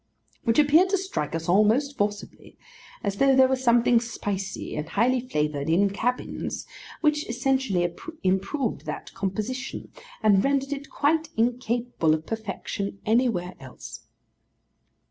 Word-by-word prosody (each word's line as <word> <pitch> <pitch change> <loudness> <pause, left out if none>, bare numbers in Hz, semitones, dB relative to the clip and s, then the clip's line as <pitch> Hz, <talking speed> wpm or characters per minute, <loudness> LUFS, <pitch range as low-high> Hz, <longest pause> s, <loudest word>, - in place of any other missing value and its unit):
which 230 - +2
appeared 305 +5 +5
to 395 - +2
strike 365 - -3
us 165 0 -4
all 190 +5 +5
most 275 +7 +1
forcibly; 205 -2 -4 0.5
as 200 -2 -2
though 270 +2 +4
there 260 0 +6
were 265 - +2
something 240 -2 +4
spicy 200 -4 -4
and 150 +1 -4
high 245 +7 +2
flavoured 150 - -2
in 195 +4 +3
cabins, 245 +5 -3 0.4
which 300 -3 +1
essentially 245 -7 +1 0.4
improved 195 +7 -1
that - - -6
composition, 215 +7 -4 0.3
and 200 -3 +5
rendered 275 0 +1
it 280 0 -7
quite 320 +2 +1
incapable 235 -7 +1
of 160 0 -7
perfection 200 -2 -4
anywhere 220 -6 +1
else. 130 -3 -11
230 Hz, 130 wpm, -25 LUFS, 195-265 Hz, 0.5 s, there